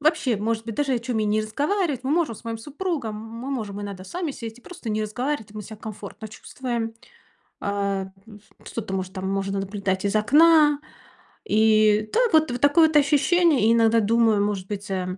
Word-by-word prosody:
вообще, 290 -6 +2
может 220 +2 -2
быть, 225 -1 -5
даже 285 -2 0
о - - 0
чём 235 -1 -2
и - - +1
не 210 +1 +1
разговаривать. 290 - -1
Мы 265 - -1
можем 310 -7 +1
с - - -16
моим 230 -1 -4
супругом, 290 - -4
мы 230 +4 -7
можем 210 -6 -4
иногда 200 -2 -7
сами 340 - -4
сесть 230 -2 -8
и - - -17
просто 335 -11 -7
не 215 0 -1
разговаривать, 245 +2 -3
и - - -17
мы 215 - -6
себя 220 +2 -10
комфортно 215 0 -8
чувствуем. 235 0 -5 0.7
А, 200 -1 -1 0.2
м, 215 - -12
ф - - -21 0.3
что-то, 215 -4 -5
может, 185 0 -3
там 190 -1 -4
можно 195 0 -1
наблюдать 195 -1 -2
из 200 +1 0
окна. 295 +6 +5 0.7
И 215 - +3
так 475 -4 +2
вот 315 -4 +4
вот 245 0 -4
такое 295 +3 +6
вот 315 - -5
ощущение. 295 - +3
И - - +5
иногда 230 0 +4
думаю, 220 -1 +3
может 200 -3 -3
быть, 205 -1 -6
э, 185 -1 -3
225 Hz, 200 wpm, -24 LUFS, 205-280 Hz, 0.7 s, такое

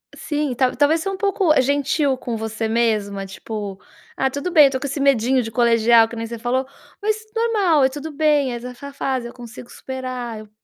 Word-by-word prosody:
sim, 295 -3 -2
talvez 290 +5 +2
ser 390 - -2
um 390 - -4
pouco, 390 -3 +1
eh, 285 - +4
gentil 280 +1 +1
com 245 -2 -4
você 220 0 -3
mesma. 215 -4 0
Tipo: 200 0 -6 0.4
"Ah, 265 - +1
tudo 285 +7 -4
bem 310 -4 +8
eu 275 - +3
tô 260 - -2
com 280 - -5
esse 285 +2 -4
medinho 265 -2 +3
de 225 - -5
colegial, 230 -1 +4
que 235 - -9
nem 230 0 -4
você 235 +1 -6
falou, 255 +3 0 0.4
mas 430 +1 +1 0.2
normal. 415 -10 +2
É - - +3
tudo 295 +3 -7
bem, 295 -3 +2
essa 245 +1 -6 0.2
fase 260 -3 -2
eu 235 - -11
consigo 240 0 -11
superar. 255 -3 -6
Eu 215 -1 -12
260 Hz, 205 wpm, -21 LUFS, 230-290 Hz, 0.4 s, bem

